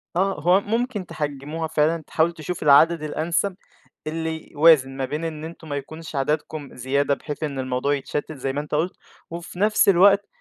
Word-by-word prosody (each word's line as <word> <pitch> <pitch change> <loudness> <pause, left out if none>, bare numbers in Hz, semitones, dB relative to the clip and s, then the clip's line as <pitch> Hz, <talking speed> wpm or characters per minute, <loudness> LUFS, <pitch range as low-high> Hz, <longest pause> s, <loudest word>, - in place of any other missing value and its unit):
آه، 195 +2 +1
هو 180 +4 +5
ممكن 225 -2 -2
تحجموها 150 +2 -4
فعلًا، 160 +1 +1
تحاول 165 +2 +2
تشوف 165 +1 -5
العدد 155 +3 +5
الأنسب، 165 +5 -1 0.5
اللي 160 0 -4
يوازن 145 -4 +5
ما 135 - -1
بين 150 +5 -4
إن 155 -1 -5
أنتم 160 -1 -10
ما 145 - -2
يكونش 155 +3 -7
عددكم 150 +1 -2
زيادة 140 +3 0
بحيث 150 +2 -6
إن 140 -3 -3
الموضوع 130 +2 0
يتشتت 145 +2 -4
زي 135 +1 -3
ما 145 - -1
أنت 150 0 -4
قُلت، 165 +5 0 0.4
وفي 170 +1 -8
نفْس 210 0 +4
الوقت 200 +2 +5
155 Hz, 175 wpm, -23 LUFS, 145-170 Hz, 0.5 s, هو